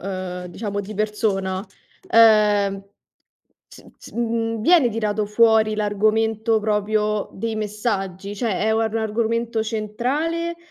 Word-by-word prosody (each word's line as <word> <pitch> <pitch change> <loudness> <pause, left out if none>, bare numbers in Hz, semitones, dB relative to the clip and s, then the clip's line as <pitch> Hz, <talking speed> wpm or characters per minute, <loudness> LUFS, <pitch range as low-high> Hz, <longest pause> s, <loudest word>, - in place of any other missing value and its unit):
ehm, 185 -1 -5
diciamo 200 +3 -4
di 205 +2 -8
persona, 200 -3 -1 0.4
ehm, 210 - +4 0.9
s - - -15
s - - -14
mhmm, 230 -1 -2
viene 330 -4 +5
tirato 215 -2 -1
fuori 220 0 +3
l'argomento 220 +2 +1
proprio 210 0 0
dei 225 +3 -3
messaggi? 205 -2 -3
Cioè, 225 +1 -1
è 220 +1 +1
un 220 - +1
ar 220 -1 -1
un - - +1
argomento 230 +1 -1
centrale, 270 +11 -2
215 Hz, 125 wpm, -22 LUFS, 205-225 Hz, 0.9 s, viene